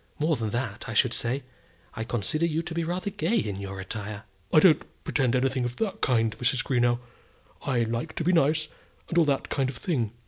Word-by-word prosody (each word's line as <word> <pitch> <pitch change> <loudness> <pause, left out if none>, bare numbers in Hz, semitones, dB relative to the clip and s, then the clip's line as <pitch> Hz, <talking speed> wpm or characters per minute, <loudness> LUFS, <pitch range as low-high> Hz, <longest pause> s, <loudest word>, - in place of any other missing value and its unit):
More 155 +1 +2
than 115 -4 -2
that, 115 -1 -3
I 115 - -4
should 120 +2 +4
say. 125 +3 -1 0.5
I 110 - -3
consider 120 - 0
you 165 0 -1
to 170 - -5
be 165 0 -1
rather 180 +4 -2
gay 190 +7 0
in 105 - -1
your 95 -1 -6
attire." 105 +2 -5 0.3
"I - - +7
don't 160 -3 +6 0.2
pretend 130 -4 +1
to - - +4
anything 130 0 +1
of 120 0 -2
that 220 -4 -2
kind, 115 -4 +2
Mrs. 125 +1 +2
Greenow. 120 -2 +2 0.6
I 125 -4 +1
like 115 +7 -3
to - - -1
be 175 - +3
nice, 155 -1 +3 0.4
and 170 - +3
all 165 - +5
that 140 -2 0
kind 135 -2 0
of 130 - -6
thing. 125 - -1
130 Hz, 215 wpm, -27 LUFS, 115-160 Hz, 0.6 s, I